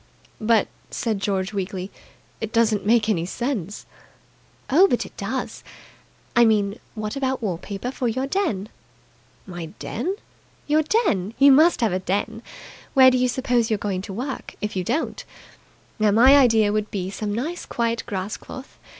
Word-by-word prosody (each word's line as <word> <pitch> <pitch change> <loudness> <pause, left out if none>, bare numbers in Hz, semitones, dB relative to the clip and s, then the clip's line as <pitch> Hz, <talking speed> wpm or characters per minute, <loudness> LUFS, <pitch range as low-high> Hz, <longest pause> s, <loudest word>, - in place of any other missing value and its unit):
"But," 220 -1 +3 0.2
said 220 -4 -2
George 195 0 -1
weakly, 190 -1 -4 0.5
"it 225 -1 -4
doesn't 225 -3 +2
make 225 -1 +4
any 175 -6 0
sense." 215 - -3 0.8
"Oh, 340 +9 +6
but - - 0
it - - -13
does. - - -4 0.7
I 240 - +7
mean, 210 -1 +2 0.2
what 215 +1 -4
about 265 -2 -1
wall 180 -6 -2
paper 205 +6 -5
for 255 -2 -2
your 260 +4 -1
den?" 270 - -1 0.8
"My 175 -3 -7
den?" 345 - -3 0.5
"Your 305 +1 +3
den. 290 - 0
You 280 0 +7
must 310 +2 +5
have 225 -6 +2
a 185 - 0
den. 205 +4 -2 0.5
Where 260 -1 +8
do 255 - +2
you 250 - +3
suppose 245 -2 +1
you're 215 - +1
going 200 -2 -2
to 200 - -8
work, 255 +7 -5
if 210 -1 -4
you 185 - -1
don't? 310 - -2 0.8
Now, 215 -1 +4
my 240 +7 +7
idea 225 -6 +4
would 215 0 -1
be 190 -2 -4
some 205 +1 -4
nice 295 +12 -4
quiet 230 -1 -1
grass 195 +1 -3
cloth. 260 0 -11
220 Hz, 165 wpm, -23 LUFS, 200-260 Hz, 0.8 s, Where